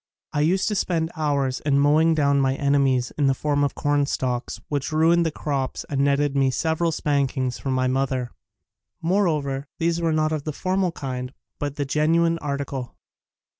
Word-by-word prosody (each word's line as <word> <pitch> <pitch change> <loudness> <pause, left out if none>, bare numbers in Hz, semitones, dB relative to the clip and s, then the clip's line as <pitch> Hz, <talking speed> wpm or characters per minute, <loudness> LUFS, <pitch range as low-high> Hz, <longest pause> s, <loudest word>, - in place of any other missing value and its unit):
I 145 - +1
used 185 +5 +2
to - - -1
spend 170 -4 0
hovirs 140 -5 -1
in 145 -2 +2
mowing 155 +3 +4
down 140 -2 +3
my 135 0 +1
enemies 135 -3 +2
in 145 - +3
the 135 - +3
form 145 +1 0
of 140 - -1
corn 145 -1 +1
stalks 125 -3 -2
which 145 -1 -2
ruined 165 +2 +3
the - - -1
crops 140 -3 -3
and 140 -1 +1
netted 140 0 +2
me 135 -1 +3
several 160 +5 0
spankings 135 -4 -1
from 135 - -2
my 130 0 +1
mother. 130 -1 -1 0.7
Moreover 155 -7 0
these 170 +1 0
were 165 -1 +1
not 155 0 +1
of 155 -2 -2
the 155 - -4
formal 185 +2 0
kind 130 -4 -5 0.2
but 145 -1 -3
the 145 - -2
genuine 165 +4 +2
article. 140 -3 -4
145 Hz, 175 wpm, -23 LUFS, 135-160 Hz, 0.7 s, mowing